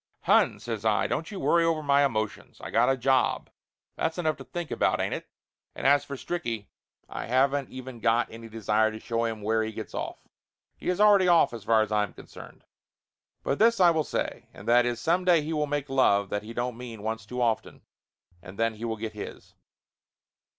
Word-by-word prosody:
"Hon," - - +4
says 115 -3 -5
I, 110 -1 +2
"don't 160 - -2
you 200 -3 -6
worry 170 -2 +3
over 165 -2 +1
my 140 0 +4
emotions. 110 -6 -2
I - - -8
got - - +3
a 135 - +2
job, 130 0 +1 0.4
that's 160 +1 -2
enough 160 -3 0
to 135 - -9
think 175 +3 -6
about, - - +1
ain't - - -1
it? - - -6 0.5
And - - -7
as 140 +1 +5
for 140 - -6
Stricky, 120 -9 -4 0.4
I - - -6
haven't 135 +3 +2
even 130 -2 -9
got 115 +1 +2
any 115 0 -10
desire 110 0 +1
to 110 0 -8
show 115 +1 -1
him 110 -2 -4
where 110 +1 +1
he 110 0 -2
gets 110 -1 -8
off. - - -4 0.6
He - - -5
is 180 +1 0
already 205 -3 +6
off 170 -7 +4
as 115 -4 -8
far 110 -1 +4
as 110 - -7
I 105 0 +2
am 105 -4 -3
concerned. - - -13 0.8
But 140 - -1
this 230 -1 +4
I 175 -2 +7
will 160 -2 +1
say, - - -4
and - - -12
that 120 +1 +5
is, 120 -1 -2
some 175 +6 +1
day 175 -4 +4
he 160 +2 -3
will 150 -1 0
make 145 0 -2
love 100 -7 +3
that 105 - -1
he 110 - -9
don't 120 0 -3
mean 115 -4 -8
once 110 0 -3
too 125 +2 -5
often, 115 -2 -1 0.6
and 90 +3 -12
then 115 0 +1
he 110 +2 -7
will 110 -1 -2
get 110 0 -5
his." 105 - -9
120 Hz, 215 wpm, -27 LUFS, 110-150 Hz, 0.8 s, I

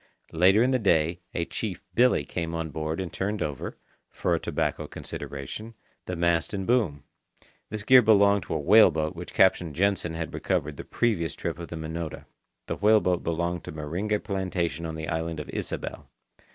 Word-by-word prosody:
Later 95 +7 +5
in 130 - +2
the 130 - +2
day, 85 -4 +2 0.2
a 85 - 0
Chief 95 -2 -4
Billy 120 - +4
came 85 +4 -3
on 80 -1 -3
board 80 +2 -3
and 95 -3 -4
turned 105 +2 -1
over, 75 -4 -5 0.3
for - - -1
a - - +2
tobacco - - -2
consideration, 90 - -7 0.3
the 90 - -2
mast 85 +2 +1
and 95 -1 -3
boom. 100 - +1 0.7
This 105 +1 -4
gear 130 +4 +8
belonged 100 -2 +5
to - - -3
a - - 0
whale 105 +8 +7
boat 80 +1 -2
which 85 +1 -8
Captain 90 -5 +3
Jansen 95 -3 +1
had 80 0 -4
recovered 75 0 -1
the - - -6
previous 90 - 0
trip - - -4
of 85 - -6
the - - -7
Minota. 80 0 -5 0.4
The - - -3
whale 110 +1 +5
boat 90 -3 0
belonged 85 +1 -1
to - - -6
Meringe 85 +8 -2
Plantation 90 -5 -2
on 80 - -5
the 80 0 -5
island 80 0 -2
of 75 - -7
Ysabel. - - -5
85 Hz, 185 wpm, -27 LUFS, 80-100 Hz, 0.7 s, gear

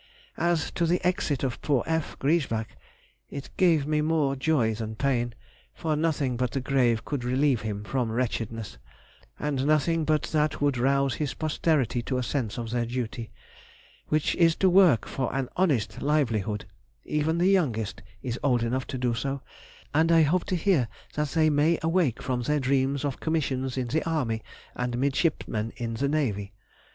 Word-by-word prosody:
As 170 -2 +1
to 170 - 0
the 175 +2 +2
exit 180 -7 0
of 130 -4 -2
poor 140 -6 +1
F. 160 -1 -2
Griesbach, 135 -7 0 0.5
it 140 -1 -7
gave 165 -6 +3
me 150 0 +1
more 150 -3 +1
joy 135 -5 +1
than 110 0 -5
pain; 120 -2 0 0.4
for 155 -2 -1
nothing 150 -5 0
but 125 0 0
the 135 - -2
grave 125 -4 +1
could 140 -4 -3
relieve 130 0 +2
him 105 -1 -4
from 120 0 -1
wretchedness; 115 - -3 0.6
and 140 -3 -1
nothing 155 +2 +2
but 155 -1 +1
that 150 -1 +1
would 145 -3 +1
rouse 135 +1 +2
his 145 +2 -3
posterity 155 -6 +1
to 130 +2 -2
a 125 - -1
sense 120 -4 -2
of 115 -2 -4
their 120 -1 0
duty, 120 -1 -4 0.8
which 155 -1 +1
is 165 -2 +4
to 190 -2 +3
work 175 - +5
for 130 - -2
an 135 -2 -1
honest 125 - +1
livelihood; 115 -9 0 0.4
even 150 +2 0
the 180 +2 +3
youngest 115 - 0 0.2
is 125 -2 -3
old 125 -4 +2
enough 125 +2 -1
to 130 - -4
do 125 -1 0
so, 135 +3 -3 0.5
and 160 +3 +3
I 165 -1 +6
hope 170 +4 +1
to 185 - -1
hear 170 - +2 0.3
that 150 0 0
they 155 +1 +3
may 150 +3 +3
awake 165 -7 +1
from 125 -1 -1
their 150 +5 +1
dreams 135 +1 +1
of 140 -3 -3
commissions 135 -5 -1
in 125 -2 -2
the 160 +6 0
army 120 -9 -1 0.3
and 125 -1 -2
midshipmen 135 -5 0
in 115 -2 -3
the 135 +5 0
navy. 110 -9 -1
135 Hz, 175 wpm, -27 LUFS, 120-155 Hz, 0.8 s, I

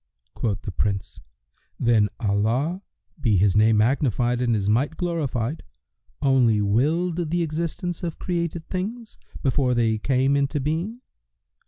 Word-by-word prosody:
Quoth 105 -4 -2
the 100 - -4
Prince, 100 +1 -2 0.6
"Then 110 -3 +3
Allah 115 - 0 0.4
(be 110 -7 +3
His 95 +1 +3
name 110 +1 +5
magnified 120 0 +1
and 120 -2 +2
His 100 -2 -1
might 130 +9 +1
glorified!) 155 -6 -2 0.6
only 125 -6 +4
willed 160 - +1
the 175 +1 +1
existence 170 +2 -3
of 170 -3 -4
created 170 -2 -3
things, 215 +5 -5 0.2
before 130 -1 +2
they 110 -2 +1
came 135 +3 +2
into 140 +1 0
being?" 165 - -2
135 Hz, 130 wpm, -24 LUFS, 110-165 Hz, 0.6 s, name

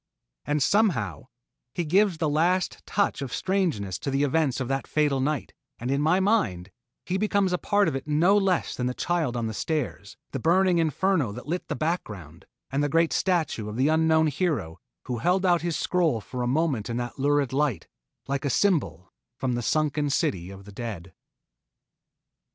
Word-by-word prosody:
And 145 -1 +1
somehow, 205 - +1 0.5
he 175 - -1
gives 190 +2 +3
the 160 -1 0
last 170 +5 +1
touch 200 -7 0
of 135 -3 -4
strangeness 155 - -1
to - - -3
the 135 +1 +1
events 145 -2 +1
of 130 - -2
that 135 +1 -2
fatal 150 -3 +1
night, 145 +1 -2 0.2
and 120 +3 -3
in 140 +1 +1
my 160 +5 +3
mind, 190 - +1 0.3
he 190 +2 -1
becomes 200 -3 +1
a 180 - 0
part 205 -1 +2
of - - -1
it 135 +2 -5
no 165 +7 +4
less 195 -3 +1
than 125 - -2
the 125 - -2
child 160 -8 -1
on 115 - -1
the 110 - -3
stairs, 125 -7 -3
the 135 - -3
burning 180 +4 +3
inferno 165 - +1
that 125 - -8
lit 175 +5 -3
the - - -3
background, 100 - -4 0.2
and 140 +2 0
the 145 - +1
great 165 +2 +2
statue 160 - 0
of 105 - -6
that 130 +3 +3
unknown 160 0 +3
hero 145 - -1 0.2
who 125 -2 -4
held 185 +6 +1
out 175 -2 +3
his 170 -1 -1
scroll 170 -10 +1
for 125 +4 -6
a 120 - 0
moment 135 -5 0
in 115 - -2
that 120 +2 -5
lurid 145 -1 +1
light, 140 - 0 0.4
like 140 0 -2
a 140 - 0
symbol 120 - 0 0.2
from 130 -2 -1
the 120 - -1
sunken 150 +2 0
City 90 -9 -1
of 100 0 -11
the 105 - -11
Dead. 100 -5 -7
150 Hz, 190 wpm, -26 LUFS, 125-175 Hz, 0.5 s, no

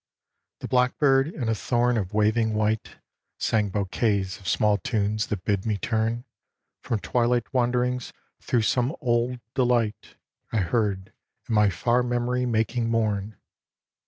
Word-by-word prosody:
The - - -4
blackbird 135 +2 +3
in 145 -7 -4
a 115 - +2
thorn 120 +3 +1
of 100 -4 -2
waving 110 +1 +2
white 110 +1 -1 0.4
Sang 105 -2 +1
bouquets 100 0 -1
of 95 - -11
small 105 +2 +2
tunes 105 +1 -1
that 95 -4 -4
bid 100 -2 0
me 110 -2 -1
turn 115 +3 -1 0.6
From 115 - -1
twilight 120 +2 0
wanderings 125 0 0 0.3
thro' 120 - +1
some 125 +7 +1
old 120 +1 0
de 130 - +2
light 120 -3 0 0.4
I - - 0
heard 100 0 -1 0.3
in 120 - -2
my 105 -1 +5
far 120 +7 +1
memory 125 +1 0
making 115 +1 0
mourn. 110 -3 -1
115 Hz, 140 wpm, -25 LUFS, 105-125 Hz, 0.6 s, my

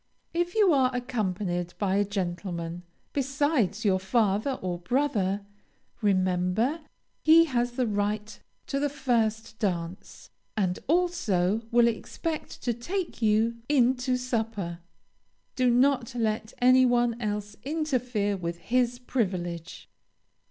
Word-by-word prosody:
If 345 +2 -1
you 410 -6 +5
are 260 -2 +4
accompanied 190 -8 -2
by 195 -1 +1
a 205 - +4
gentleman, 175 -3 -4 0.3
besides 270 - 0
your 190 -2 +3
father 210 +4 +1
or 180 -8 -4
brother, 205 -3 0 0.6
remember 185 - +1 0.4
he 325 +1 +7
has 245 -4 0
the 250 0 0
right 210 0 -2 0.3
to 275 - -2
the 290 +1 +1
first 225 -5 -1
dance, 180 -3 -4 0.3
and 185 -3 0
also 225 - +1
will 235 0 +5
expect 310 +7 -4
to 240 - +1
take 340 - -4
you 220 +1 +2
in 260 -3 +4
to 250 0 0
supper. 225 -8 -3 0.8
Do 255 -2 +3
not 245 -1 +2
let 220 -1 -1
any 255 +1 +6
one 240 -1 +2
else 210 -1 -3
interfere 250 -9 -1
with 170 -2 -4
his 245 +5 0
privilege. 180 -9 -3
225 Hz, 120 wpm, -27 LUFS, 195-255 Hz, 0.8 s, he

